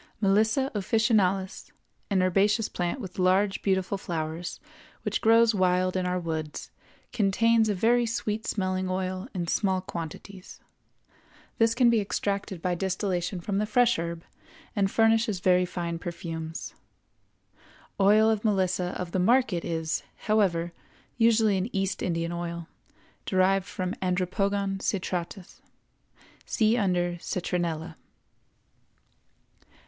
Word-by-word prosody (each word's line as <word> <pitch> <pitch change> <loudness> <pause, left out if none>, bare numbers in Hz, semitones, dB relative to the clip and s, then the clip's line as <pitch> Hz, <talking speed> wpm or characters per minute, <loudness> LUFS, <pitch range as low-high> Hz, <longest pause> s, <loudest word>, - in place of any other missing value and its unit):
Melissa 220 +6 +2
officinalis, 200 -3 +1 0.4
an 190 -3 +2
herbaceous 205 +4 +2
plant 175 +8 -2
with 190 -5 -8
large, 190 +2 +2
beautiful 190 0 0
flowers, 165 -1 -4 0.4
which - - -1
grows 230 0 +5
wild 185 -1 +2
in 185 -1 0
our 180 0 0
woods, 160 -3 -5 0.4
contains 225 +1 +3
a 205 - +1
very 235 +5 +3
sweet 220 -1 -3
smelling 185 -2 -1
oil 185 +2 -3
in 175 -2 -1
small 190 +2 +1
quantities. 185 +2 -8 1.0
This 225 0 +3
can 240 -1 +5
be 225 -2 +3
extracted 200 -3 -3
by 180 - +1
distillation 185 0 -2
from 195 +3 -1
the 210 - 0
fresh 240 -2 +3
herb, 170 0 -4 0.5
and 200 -2 +2
furnishes 225 -2 +2
very 180 0 +3
fine 170 -2 -4
perfumes. 165 -2 -6 1.3
Oil 210 +3 +5
of 220 -2 +1
Melissa 185 -4 0
of 180 -1 -4
the 185 - 0
market 225 -3 +2
is, 160 -1 -2 0.2
however, 175 -6 +1 0.5
usually 225 -3 +4
an 190 +5 -2
East 195 0 -1
Indian 170 -1 -1
oil, 170 -1 -5 0.6
derived 190 0 +2
from 185 0 -3
Andropogon 195 +2 0
citratus. 185 -1 -4 0.8
See 220 +1 +2
under 180 -5 0
Citronella. 170 -2 -3
190 Hz, 120 wpm, -27 LUFS, 175-210 Hz, 1.3 s, grows